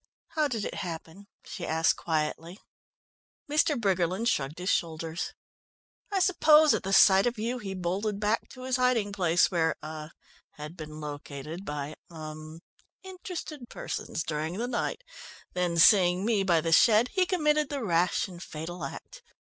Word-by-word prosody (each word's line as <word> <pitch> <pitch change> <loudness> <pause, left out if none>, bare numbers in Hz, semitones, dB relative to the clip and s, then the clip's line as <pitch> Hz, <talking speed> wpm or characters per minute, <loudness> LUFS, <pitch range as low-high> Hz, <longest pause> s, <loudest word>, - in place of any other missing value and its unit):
"How 305 -2 +1
did 230 -6 -3
it - - -4
happen?" 175 +1 -7 0.2
she 185 - -7
asked 160 -1 +2
quietly. 165 +2 -3 0.9
Mr. 300 -1 +2
Briggerland 190 +2 +1
shrugged 140 - -1
his 180 +2 -1
shoulders. 165 0 -2 0.8
"I 400 - 0
suppose 315 -5 +5
at - - 0
the 195 - -4
sight 195 +1 +6
of 240 -1 -2
you 235 +4 -2
he 195 -4 -5
bolted 195 +3 -2
back 210 +2 0
to 255 - -11
his 260 0 0
hiding 250 -5 +2
place 175 -3 +2
where 165 -2 +1
er 155 0 -7 0.4
had 150 +3 -9
been 155 -2 -8
located 150 +3 -7
by 150 0 -4 0.2
er 155 0 -9 0.4
interested 360 -8 -7
persons 160 - -4
during 155 +3 -3
the 240 +3 -2
night, 255 - -2 0.5
then 180 -2 -1
seeing 180 +1 +5
me 220 -3 +2
by 175 -4 +3
the 165 - -2
shed 220 +7 +5
he 375 -2 +1
committed 300 -5 +1
the 280 -3 -3
rash 175 +1 +1
and 175 -2 -11
fatal 165 +3 -7
act. - - -8
185 Hz, 155 wpm, -28 LUFS, 160-240 Hz, 0.9 s, sight